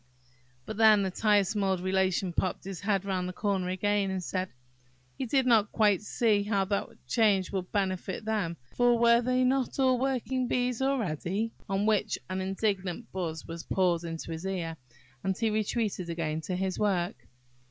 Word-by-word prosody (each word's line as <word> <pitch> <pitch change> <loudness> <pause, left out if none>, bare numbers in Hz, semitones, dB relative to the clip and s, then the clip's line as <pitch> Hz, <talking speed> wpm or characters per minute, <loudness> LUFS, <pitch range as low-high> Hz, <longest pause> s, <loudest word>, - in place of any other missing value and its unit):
But 215 - -6
then 215 -2 +6
the 190 - -1
tiresome 205 0 +2
old 190 -1 +1
Relation 185 0 0
popped 185 +2 -1
his 190 -2 -6
head 200 -2 0
round 185 -2 -1
the - - -6
corner 195 -2 -1
again, 200 +1 +1
and 190 -1 -3
said, 185 +1 -2 0.7
he 260 - -3
did 265 +2 +2
not 220 -4 +4
quite 210 -4 +3
see 210 0 +2
how 200 -1 0
that 200 +1 -1 0.2
change 205 -5 +2
would 185 -2 -3
benefit 190 0 -2
them, 205 -7 -1 0.2
for 245 -1 +4
were 235 0 +5
they 255 +1 +1
not 260 0 +1
all 260 -2 +3
working 255 -1 0
bees 250 0 0
already?–on 205 - -1
which 215 -1 +1
an 185 0 -1
indignant 195 +1 -2
buzz 165 -4 -4
was 165 0 -6
poured 175 -2 +1
into 165 0 -5
his 165 +1 -5
ear, 170 -4 -3 0.5
and 190 -1 -1
he 225 -2 +1
retreated 210 -4 -1
again 160 -2 -2
to 180 +3 -3
his 185 0 -2
work. 185 -4 -1
195 Hz, 170 wpm, -29 LUFS, 185-220 Hz, 0.7 s, then